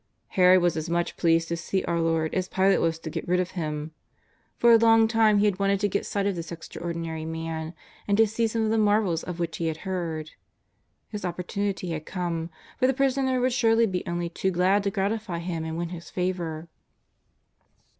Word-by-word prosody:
Herod 185 -1 +5
was 175 -2 +2
as 160 +1 -3
much 170 0 -1
pleased 165 -1 +2
to 170 - 0
see 190 +3 -2
our 170 -1 0
Lord 165 -1 0
as 185 -1 -1
Pilate 195 +1 +2
was 165 -1 +1
to 160 -1 -7
get - - -5
rid 180 +1 +2
of 185 0 -1
Him. 155 -3 -4 0.7
For 235 - +5
a 230 - +8
long 225 0 +5
time 220 -2 +4
he 205 - +3
had 200 -2 +1
wanted 200 0 +2
to 205 - +3
get 200 - -1
a - - -11
sight 200 -1 -1
of 200 -2 0
this 170 -1 -6
extraordinary 165 -1 -5
Man, 160 0 -5 0.3
and 200 0 +2
to 225 - +6
see 220 +2 0
some 225 0 -1
of 220 - +1
the 225 - +2
marvels 205 -5 +2
of 180 -1 -6
which 170 -1 -2
he 165 - -1
had 160 -1 -2
heard. 165 -5 -3 0.8
His 210 -2 -5
oppor 180 0 -4
tunity 200 -3 -2
had 155 -1 -5
come, 170 -3 -3 0.3
for 255 - +4
the 265 - +1
Prisoner 265 -1 +1
would 250 0 +1
surely 230 -1 +4
be 185 -4 -2
only 175 0 -2
too 185 +3 -2
glad 190 +3 +2
to - - +2
gratify 200 -1 -2
him 170 -1 -4
and 160 0 -4
wdn 170 0 -3
his 170 -2 -8
favour. 175 -3 -3
180 Hz, 215 wpm, -26 LUFS, 165-205 Hz, 0.8 s, a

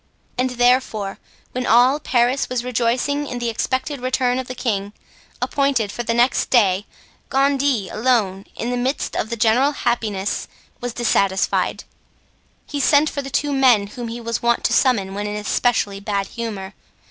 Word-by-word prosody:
And 255 +1 0
therefore, 245 -5 +1 0.3
when 255 0 -3
all 250 +5 +5
Paris 250 -1 +1
was 250 -1 -2
rejoicing 250 +4 0
in 250 - -5
the 240 -1 -1
expected 260 +4 -2
return 255 0 +1
of 260 - -5
the 255 - -6
king, 205 -5 -2 0.5
appointed 275 -7 0
for 240 - -4
the 230 -1 -1
next 240 +2 +2
day, 205 -5 +3 0.4
Gondy 275 -5 +1
alone, 215 -5 0
in 240 - -3
the 245 - -1
midst 260 +3 -2
of 220 - -2
the 235 - -2
general 245 +6 +3
happiness, 215 -6 -1 0.3
was 245 -1 -4
dissatisfied; 200 -5 +1 0.8
he 290 - -4
sent 290 +2 +4
for 280 - -3
the 275 - -7
two 290 +1 0
men 250 -7 +4
whom 235 +4 -7
he 230 +1 -6
was 230 0 -3
wont 235 0 +1
to - - +1
summon 205 -8 +2
when 205 +1 -3
in 210 - -4
especially 210 -1 0
bad 200 -1 -2
humor. 210 -4 -5
240 Hz, 165 wpm, -21 LUFS, 210-260 Hz, 0.8 s, all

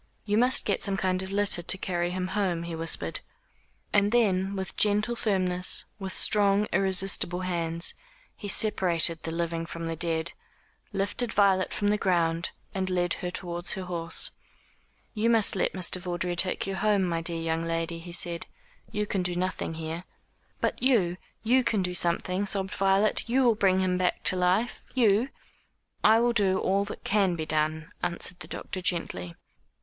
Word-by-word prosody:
"You 205 -1 0
must 250 +4 +4
get 200 - 0
some 195 -1 -1
kind 185 0 +1
of 190 0 -6
litter 200 -3 +1
to 180 - +1
carry 175 -2 -1
him 185 0 -3
home," 185 -5 -1
he 170 0 -6
whispered. 165 0 -1 0.7
And 205 0 +3
then 200 -5 +2
with 190 -1 -5
gentle 210 +3 +2
firmness, 185 -5 0
with 190 -1 -5
strong 205 +1 +3
irresistible 190 -1 +3
hands, 170 -2 -1 0.4
he 205 - -7
separated 175 -5 +1
the - - -5
living 165 0 -2
from 165 0 -6
the 165 0 -3
dead, 165 0 0 0.6
lifted 205 +4 -1
Violet 195 -2 +3
from 205 - 0
the 210 0 +1
ground 170 -2 +1 0.2
and 190 -1 -2
led 175 -1 +1
her 180 - -2
towards 175 -1 -2
her 190 - -4
horse. 170 -2 +1 0.8
"You 225 +1 +1
must 225 -4 +3
let 190 - 0
Mr. 185 -1 -1
Vawdrey 175 -1 -2
take 185 +1 +1
you 195 - -3
home, 210 -2 +2
my 170 -2 -1
dear 165 0 -3
young 165 0 -1
lady," 165 0 -2
he 175 +1 -9
said. 170 -1 -3 0.4
"You 210 0 -1
can 195 -2 -1
do 180 -1 -1
nothing 180 -2 -2
here." 160 +2 -5 0.6
"But - - -1
you 210 -9 +2 0.3
you 250 +3 +3
can 210 -5 +1
do 180 0 -2
something," 180 +3 0
sobbed 190 -1 -2
Violet, 195 +2 +2
"you 260 +2 +3
will 240 -2 +5
bring 190 -3 +2
him 180 -1 0
back 180 -1 0
to - - +3
life 185 +6 +1
you 230 0 +3 0.4
" - - -45 0.3
"I 220 +1 +6
will 240 0 +2
do 195 -4 +2
all 195 +1 +1
that 205 - -8
can 195 -4 +2
be 160 -2 -4
done," 155 0 -1
answered 175 +1 -2
the - - -9
doctor 185 - -5
gently. 90 - -2
185 Hz, 175 wpm, -27 LUFS, 170-200 Hz, 0.8 s, I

